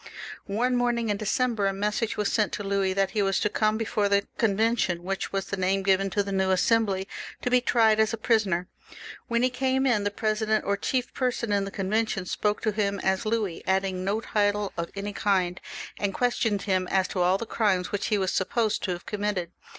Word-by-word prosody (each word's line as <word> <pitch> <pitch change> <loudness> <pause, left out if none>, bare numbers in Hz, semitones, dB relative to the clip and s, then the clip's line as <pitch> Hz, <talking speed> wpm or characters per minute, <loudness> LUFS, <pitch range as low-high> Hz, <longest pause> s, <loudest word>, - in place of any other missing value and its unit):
One 240 +5 +1
morning 240 -2 +1
in 205 - 0
December 225 -1 0
a 195 - 0
message 210 +3 -1
was 210 - 0
sent 215 -2 +2
to 205 - -3
Louis 195 -1 0
that 195 0 +1
he 215 - 0
was 195 -1 +1
to 210 - +2
come 215 +1 +1
before 210 -2 0
the 200 0 +2
Convention, 220 -4 +1
which 195 +1 -3
was 195 0 -2
the 200 - -4
name 190 +1 +1
given 195 0 +2
to 205 +1 0
the 200 - -5
new 190 -1 +1
Assembly, 195 0 +2 0.4
to 250 - -1
be 250 0 +5
tried 225 -3 +3
as 220 -1 +3
a 230 - -3
prisoner. 210 -6 +1 0.6
When 235 0 +1
he 255 - +2
came 265 +1 0
in, 225 -6 +2
the 205 - +1
president, 215 +1 0
or 200 - +1
chief 250 +5 -2
person 245 -4 -1
in 200 -1 +1
the - - -5
Convention, 200 0 -1
spoke 210 +3 -1
to 215 - +2
him 200 -1 -1
as 190 +3 0
Louis, 215 -6 -1
adding 190 -1 0
no 205 +3 0
title 205 -2 0
of 170 0 -3
any 200 +1 -4
kind, 185 -4 0 0.4
and 200 -2 -1
quloned 230 -4 0
him 185 -2 0
as 190 0 +1
to 185 - -2
aU 180 +2 +3
the 230 - -5
crimes 200 -5 0
which 205 -1 -1
he 210 - +2
w^ 190 -1 0
supposed 215 +4 0
to 185 - -1
have 175 - -8
committed. 205 -4 -2
205 Hz, 215 wpm, -26 LUFS, 195-220 Hz, 0.6 s, be